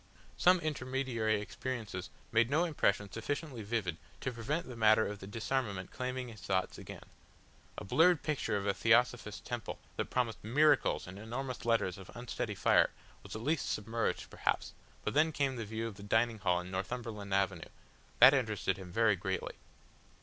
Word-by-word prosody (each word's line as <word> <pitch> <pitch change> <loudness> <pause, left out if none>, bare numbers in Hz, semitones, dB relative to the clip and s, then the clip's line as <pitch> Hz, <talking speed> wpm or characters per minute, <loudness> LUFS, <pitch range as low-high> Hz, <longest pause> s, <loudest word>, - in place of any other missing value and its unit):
Some 180 0 +5
intermediary 130 -7 0
experiences 105 -3 -5 0.2
made 115 +1 +4
no 155 +5 +3
impression 105 - +1
sufficiently 140 +2 -4
vivid 100 -6 -2 0.2
to 130 - -1
prevent 125 +8 -2
the 125 - -7
matter 110 -1 +5
of 105 -1 -5
the 95 - -9
disarmament 110 -3 -2
claiming 130 0 -3
his 110 -3 -11
thoughts 95 -1 -1
again; - - -9 0.7
a - - -5
blurred 165 - +4
picture 135 -8 0
of 100 - -3
a 100 - +2
Theosophist 115 -1 +2
temple 120 -3 -4 0.2
that - - -2
promised 120 -4 -1
MIRACLES 145 +6 +3
in 95 +2 -9
enormous 125 +4 -5
letters 115 -6 +1
of 95 - -11
unsteady 120 -3 -4
fire - - +4 0.3
was - - -9
least 135 +6 -1
submerged 115 +2 -2
perhaps, - - -1 0.3
but - - -1
then 155 +3 +4
came 140 -3 0
the 115 -2 -4
view 110 +2 -3
of 110 -4 -6
the - - -10
dining 110 +2 +1
hall 90 -3 +2
in 90 +1 -7
Northumberland 105 +1 -4
Avenue. 95 -3 0 0.5
That 125 +3 +10
interested 110 -8 0
him 95 -2 -9
very 110 +1 +4
greatly. 95 +1 -3
115 Hz, 165 wpm, -33 LUFS, 100-130 Hz, 0.7 s, That